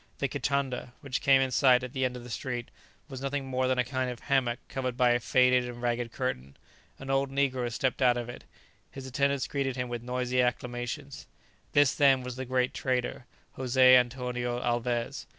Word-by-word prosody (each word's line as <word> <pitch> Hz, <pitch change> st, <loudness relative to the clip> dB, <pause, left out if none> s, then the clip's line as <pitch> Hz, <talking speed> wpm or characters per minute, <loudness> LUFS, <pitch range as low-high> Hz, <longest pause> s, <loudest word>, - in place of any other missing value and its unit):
The -, -, 0 dB
kitanda, 135 Hz, -3 st, -2 dB
which 140 Hz, -4 st, -3 dB
came 135 Hz, -1 st, +5 dB
in 130 Hz, -1 st, 0 dB
sight 125 Hz, 0 st, +4 dB
at 130 Hz, 0 st, -6 dB
the 130 Hz, -2 st, -1 dB
end 125 Hz, 0 st, -2 dB
of 120 Hz, -, -10 dB
the 120 Hz, -, -10 dB
street, 120 Hz, 0 st, -4 dB, 0.4 s
was 135 Hz, -3 st, -8 dB
nothing 135 Hz, 0 st, -2 dB
more 130 Hz, -1 st, 0 dB
than 130 Hz, 0 st, +1 dB
a 125 Hz, -, +3 dB
kind 130 Hz, +1 st, -2 dB
of 125 Hz, -1 st, -6 dB
hammock 125 Hz, -3 st, +1 dB
covered 130 Hz, -2 st, -3 dB
by 125 Hz, -1 st, +4 dB
a 120 Hz, -, +3 dB
faded 125 Hz, +1 st, +3 dB
and 120 Hz, -1 st, -7 dB
ragged 120 Hz, -1 st, -1 dB
curtain. 70 Hz, -, -4 dB, 0.4 s
An 135 Hz, 0 st, -6 dB
old 135 Hz, 0 st, +1 dB
negro 130 Hz, -3 st, 0 dB
stepped 130 Hz, +3 st, -1 dB
out 125 Hz, -1 st, +4 dB
of 120 Hz, -1 st, -4 dB
it. 120 Hz, -, -9 dB, 0.5 s
His 135 Hz, -1 st, -9 dB
attendants 140 Hz, +1 st, 0 dB
greeted 135 Hz, -2 st, -2 dB
him 125 Hz, -1 st, -3 dB
with 120 Hz, -1 st, -4 dB
noisy 125 Hz, +1 st, 0 dB
acclamations. 125 Hz, +3 st, -3 dB, 0.5 s
This, 145 Hz, -2 st, +5 dB
then, 135 Hz, -3 st, +4 dB
was 125 Hz, -1 st, -6 dB
the 130 Hz, +1 st, -5 dB
great 125 Hz, 0 st, 0 dB
trader, 125 Hz, -1 st, -2 dB, 0.3 s
José 130 Hz, 0 st, +5 dB
Antonio 125 Hz, -1 st, 0 dB
Alvez. 120 Hz, -1 st, -2 dB
125 Hz, 195 wpm, -29 LUFS, 120-135 Hz, 0.5 s, came